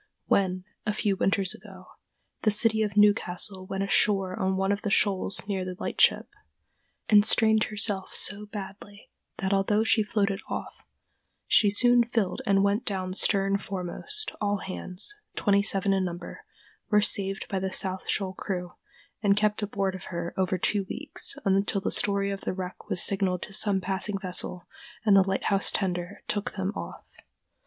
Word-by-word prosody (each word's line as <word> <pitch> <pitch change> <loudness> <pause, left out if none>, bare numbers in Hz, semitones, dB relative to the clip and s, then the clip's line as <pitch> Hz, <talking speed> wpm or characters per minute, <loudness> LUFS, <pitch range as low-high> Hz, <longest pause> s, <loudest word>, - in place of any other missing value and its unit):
When, 185 -1 0 0.2
a 210 - -1
few 205 -2 0
winters 195 -1 0
ago, 190 -2 -13 0.6
the 215 - +3
City 220 +1 +2
of 210 -1 -2
Newcastle 190 -2 +1
went 195 0 -3
ashore 195 -2 +2
on 190 0 -1
one 195 +1 0
of 205 +1 -1
the 210 - -2
shoals 195 -1 +1
near 195 -2 -2
the 185 0 -6
lightship, - - +2 0.8
and 205 -1 +6
strained 220 0 +4
herself 205 -2 -1
so 205 +1 +4
badly 205 0 -10 0.3
that 190 +1 -1
although 205 +2 +2
she 225 0 +4
floated 205 -2 -1
off, - - -5 0.7
she 210 - +4
soon 240 +4 +4
filled 225 -5 -2
and 195 0 +3
went 200 +3 +1
down 185 -2 -3
stern 195 0 +2
foremost, 200 - -2
all 205 -1 0
hands, 185 - -3 0.2
twenty 200 -1 +2
seven 195 -1 +2
in 190 -1 +1
number, 175 - -7 0.4
were 210 - +4
saved 195 -1 0
by 195 - -2
the 190 0 -3
South 190 -1 -1
Shoal 190 -2 -1
crew 180 -2 -5 0.5
and 200 -1 +3
kept 210 0 +1
aboard 200 -2 -2
of 185 - -9
her 170 -1 -5
over 185 0 0
two 200 +3 0
weeks, - - -1
until 195 +1 +1
the 195 - -3
story 200 -1 +1
of 195 0 -5
the - - -3
wreck 185 -1 -7
was 175 - +2
signaled 190 -2 +1
to 205 - -8
some 200 -1 +1
passing 195 +2 -2
vessel 180 -2 -1 0.4
and 205 -2 +5
the 195 - +7
lighthouse 195 +1 +2
tender 180 -1 -3
took 205 -1 -2
them 195 +1 -3
off. - - -8
195 Hz, 165 wpm, -27 LUFS, 190-205 Hz, 0.8 s, the